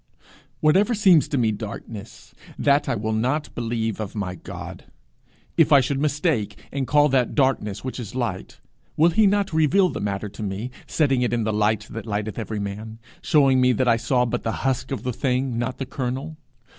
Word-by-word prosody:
Whatever 195 +10 +4
seems 190 -7 +5
to 145 - -2
me 115 -3 +2
darkness, 105 0 -8 0.2
that 140 0 +2
I - - +1
will 110 +1 -2
not 130 +7 -1
believe 115 -2 -2
of 105 -1 -5
my 100 -4 -3
God. 90 - -9 0.7
If 165 -2 +4
I 140 - +8
should 135 +1 -1
mistake, 145 - 0
and 135 -2 -2
call 145 0 +5
that 130 -2 +1
darkness 130 -8 +1
which 130 0 -5
is 115 -1 -7
light, 115 -8 -4 0.4
will 165 +3 +5
he 215 +3 +4
not 200 -2 +1
reveal 170 +5 +4
the - - -5
matter 100 0 -2
to 100 - -10
me, 105 +4 -4 0.2
setting 135 -5 +1
it 120 -1 0
in 115 -1 +1
the 110 0 -1
light 105 0 +1
that 115 0 -7
lighteth 105 +1 -3
every 110 -1 -4
man, 105 +2 -6 0.2
showing 135 -4 +4
me 125 0 +4
that 125 +2 0
I 115 -1 +4
saw 125 +1 +1
but 120 - -2
the 115 - -2
husk 130 -2 0
of 135 - -4
the 125 - -2
thing, 125 -1 -1
not 120 +2 -2
the 135 - -4
kernel? 135 +4 -4
125 Hz, 195 wpm, -23 LUFS, 110-145 Hz, 0.7 s, I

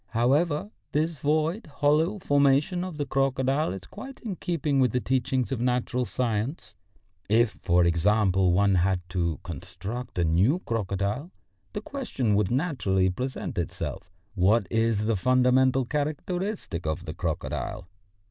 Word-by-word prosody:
However, 145 - +2 0.2
this 155 +3 +1
void, 155 - 0
hollow 150 +6 +2
formation 145 +2 +2
of 185 -4 -6
the 145 - -1
crocodile 135 - +1
is 95 -1 -6
quite 260 - -10
in 215 -6 -4
keeping 155 -6 -1
with 125 -4 +3
the 125 - +2
teachings 130 0 0
of 125 -3 -2
natural 125 0 0
science. 115 0 -2 0.6
If, 115 +1 +2
for 90 -1 +3
instance, 95 +3 +2
one 95 +1 +3
had 90 -1 +1
to 85 -4 -1
construct 120 +3 -7
a 90 - +2
new 95 - +3
crocodile, 105 - -2 0.4
the - - -3
question 255 - -2
would 100 -1 +2
naturally 120 - +1
present 125 -1 -4
itself. 90 +2 -5 0.2
What 100 +3 +3
is 115 -2 +1
the 115 0 +2
fundamental 130 +4 +3
characteristic 155 - -3
of 80 - -2
the - - -5
crocodile? 70 +5 -3
125 Hz, 140 wpm, -27 LUFS, 100-145 Hz, 0.6 s, with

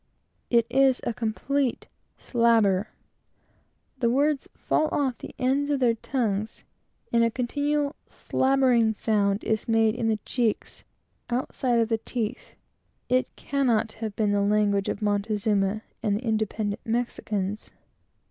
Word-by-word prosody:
It 235 -2 +4
is 265 +1 +3
a 240 - -1
complete 245 +4 -1 0.3
slabber. 225 -5 +2 1.1
The 235 -2 +2
words 280 +3 +1
fall 310 - +1
off 280 -3 0
of - - -35
the - - -9
ends 275 +3 +1
of 285 -2 +1
their 245 -3 +3
tongues, 220 -3 -2 0.5
and 235 0 +4
a 230 - +3
continual 285 +5 -1
slabbering 255 -4 +2
sound 205 -2 +1
is 220 -1 -1
made 225 -1 +3
in 230 -1 -2
the 220 -1 +2
cheeks, 235 -4 -2 0.4
outside 245 0 0
of 230 -1 +2
the 225 -1 +1
teeth. 235 +1 -4 0.5
It 255 +1 +2
cannot 245 -6 0
have 220 -2 -6
been 210 -2 +1
the 205 0 +2
language 205 -1 +2
of 205 - -3
Montezuma 205 0 0 0.2
and 210 -3 +1
the 230 - -7
independent 215 -2 -1
Mexicans. 215 -3 -2
230 Hz, 135 wpm, -26 LUFS, 215-255 Hz, 1.1 s, It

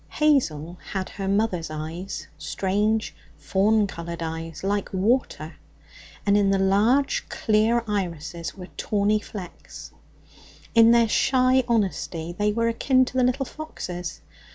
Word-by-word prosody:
Hazel 175 - +1
had 190 -1 -2
her 195 -1 -5
mother's 195 -5 0
eyes, 160 +2 -6
strange, 205 +7 -1 0.2
fawn 210 +2 +2
coloured 170 -3 -6
eyes 165 0 -6
like 200 +1 -1
water, 190 -5 0 0.7
and 200 0 +4
in 205 -1 +3
the 195 - +3
large 225 - +2
clear 220 +2 +2
irises 170 -5 -3
were 180 -1 -10
tawny 210 0 +1
flecks. 190 -4 -10 0.8
In 230 0 +7
their 235 -1 +5
shy 255 +3 +3
honesty 185 -7 -1
they 210 +1 +1
were 230 +2 0
akin 255 +3 +3
to - - -8
the 255 - +3
little 255 +2 +1
fox's. 180 - -7
200 Hz, 130 wpm, -24 LUFS, 175-230 Hz, 0.8 s, In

